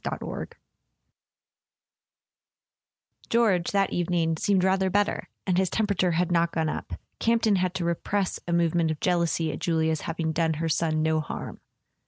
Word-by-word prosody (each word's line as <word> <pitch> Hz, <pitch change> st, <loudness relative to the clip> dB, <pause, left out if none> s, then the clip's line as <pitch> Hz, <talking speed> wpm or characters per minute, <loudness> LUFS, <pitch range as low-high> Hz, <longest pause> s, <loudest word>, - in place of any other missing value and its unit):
XXVII -, -, -4 dB, 2.8 s
EORGE, 210 Hz, -7 st, +3 dB
that 200 Hz, -1 st, +1 dB
evening, 170 Hz, -2 st, 0 dB
seemed 190 Hz, +3 st, +1 dB
rather 190 Hz, 0 st, +2 dB
better, 205 Hz, +2 st, 0 dB, 0.2 s
and 185 Hz, -1 st, +2 dB
his 190 Hz, -1 st, +1 dB
temperature 200 Hz, -5 st, +1 dB
had 180 Hz, +2 st, 0 dB
not 170 Hz, -1 st, +2 dB
gone 160 Hz, -1 st, 0 dB
up: -, -, -5 dB, 0.3 s
Camp 230 Hz, 0 st, +2 dB
ton 210 Hz, -3 st, +4 dB
had 185 Hz, 0 st, -1 dB
to 175 Hz, -, -2 dB
repress 185 Hz, +3 st, -1 dB
a -, -, -2 dB
movement 170 Hz, -1 st, +2 dB
of 155 Hz, -1 st, -3 dB
jealousy 170 Hz, -2 st, +1 dB
at 145 Hz, -, -6 dB
Julia's 160 Hz, -2 st, 0 dB
having 165 Hz, -1 st, -2 dB
done 160 Hz, 0 st, 0 dB
her 165 Hz, +2 st, -2 dB
son 155 Hz, 0 st, +1 dB
no 160 Hz, 0 st, +2 dB
harm. 155 Hz, -, -6 dB
170 Hz, 155 wpm, -26 LUFS, 160-190 Hz, 2.8 s, ton